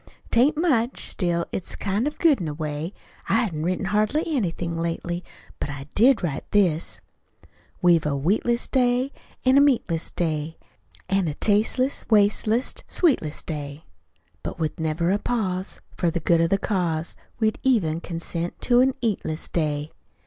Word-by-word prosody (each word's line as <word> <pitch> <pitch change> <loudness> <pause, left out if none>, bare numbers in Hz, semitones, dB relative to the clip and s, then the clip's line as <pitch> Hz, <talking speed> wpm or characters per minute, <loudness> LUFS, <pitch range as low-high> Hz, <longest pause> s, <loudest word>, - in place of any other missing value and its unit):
'Tain't 275 +6 +4
much; 265 -8 +1
still, 170 -3 0
it's 185 - -4
kind 205 +6 -1
of 300 - -4
good, 300 - +4
in 170 - -2
a 150 - -4
way. 155 +2 -4 0.4
I 230 - +3
hain't 155 -7 -4
written 185 +3 -1
hardly 215 +10 +1
anything 175 - -1
lately; 170 +1 -3 0.4
but - - -3
I 140 -2 -6
did 235 0 +4
write 150 -5 -3
this: 175 -6 +1 0.8
We've 170 -3 +4
a 145 - 0
wheatless 215 - +1
day, 250 +1 +2 0.3
An' 260 +2 +6
a - - +6
meatless 230 - +1
day, 160 -2 -2 0.5
An' 195 -2 +1
a 150 - -3
tasteless, 225 - +1
wasteless, 215 +2 +3
sweetless 250 - +1
day. 145 -1 -6 0.6
But - - -5
with 160 -2 -3
never 160 +2 0
a 200 - +1
pause, 190 -6 -2
For 175 - +1
the 170 - -2
good 165 +1 +3
of 165 - +2
the 195 - +3
cause, 175 -6 -1 0.2
We'd 220 -1 +1
even 185 -12 +2
consent 170 0 -3
to 245 -1 +4
an 265 0 +3
eatless 180 -8 -1
day. 150 -2 -1
180 Hz, 155 wpm, -24 LUFS, 160-235 Hz, 0.8 s, An